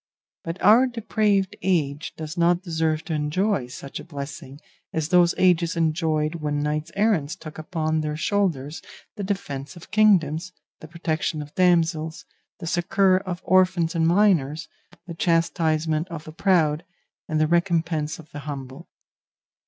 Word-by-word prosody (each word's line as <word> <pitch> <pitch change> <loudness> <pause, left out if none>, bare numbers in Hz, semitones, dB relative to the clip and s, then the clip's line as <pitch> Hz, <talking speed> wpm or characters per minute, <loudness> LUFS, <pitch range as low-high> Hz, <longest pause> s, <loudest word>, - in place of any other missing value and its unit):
But 165 +2 -5
our 230 +6 +7
depraved 210 -5 0
age 155 -5 -1
does 155 +1 -6
not 175 +1 +2
deserve 160 -3 -1
to 160 - -4
enjoy 155 - 0
such 135 +2 -8
a - - -8
blessing 140 -3 -8 0.3
as 160 -1 -2
those 175 -1 +4
ages 175 -2 +3
enjoyed 155 -1 +1
when 145 -1 -1
knights 150 +2 -2
errant 200 -8 +2
took 155 -1 -9
upon 155 -1 -1
their 150 0 -3
shoulders 165 -6 -1 0.3
the 205 - -5
defence 150 -7 -4
of 170 - -13
kingdoms, 185 -5 +3 0.3
the 155 - -10
protection 160 -2 -2
of 145 - -14
damsels, 165 -3 +1 0.3
the - - -8
succour 185 +2 +2
of 185 -2 -5
orphans 185 -3 +3
and 165 -1 +2
minors, 170 -6 +2 0.4
the 170 - -7
chastisement 165 -1 +1
of 165 -3 -7
the 155 - -10
proud, 165 -4 +2 0.4
and 155 -1 0
the 155 - +4
recompense 165 -2 0
of 160 -2 -15
the 145 - -7
humble. 135 -2 -8
165 Hz, 145 wpm, -24 LUFS, 155-180 Hz, 0.4 s, our